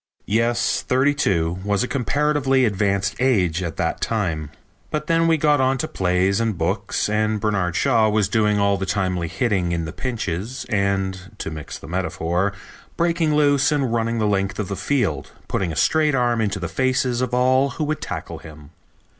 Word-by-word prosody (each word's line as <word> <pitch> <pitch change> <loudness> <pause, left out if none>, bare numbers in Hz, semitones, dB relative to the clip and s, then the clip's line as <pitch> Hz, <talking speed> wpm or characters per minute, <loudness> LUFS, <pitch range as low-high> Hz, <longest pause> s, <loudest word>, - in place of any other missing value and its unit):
Yes, 115 +3 +1
thirty 130 +3 +2
two 85 - 0
was 100 +2 +1
a - - -2
comparatively 140 0 +1
advanced 100 -2 0
age 95 -10 +2
at 85 -3 -4
that - - -1
time. 80 -10 -1 0.4
But 150 0 -3
then 165 +1 +2
we 165 -1 +4
got 150 -2 +3
on 130 +1 +2
to - - -2
plays 95 +2 +1
and 115 -4 -1
books, 95 +5 -1
and 110 0 0
Bernard 100 -5 0
Shaw 110 -2 +3
was 105 -2 +2
doing 105 -1 +2
all 100 0 +2
the 95 0 -4
timely 90 -4 -1
hitting 95 -4 0
in 85 -1 -1
the 80 - -6
pinches, 115 -1 -4
and, 95 -1 -1
to - - -5
mix 75 -2 -7
the - - -12
metaphor, 85 +2 -1 0.5
breaking 165 -2 +1
loose 145 -1 +3
and 135 -5 0
running 115 0 0
the 110 - +1
length 95 -2 0
of 105 -2 -3
the 100 - -2
field, 95 - -1
putting 90 -3 -1
a - - -5
straight 155 - +2
arm 120 -2 +1
into 100 -2 -1
the 90 - -3
faces 130 - 0
of 125 -1 -1
all 130 +2 +3
who 155 - -1
would 155 +1 -2
tackle - - -5
him. 75 -2 -13
105 Hz, 185 wpm, -22 LUFS, 95-130 Hz, 0.5 s, we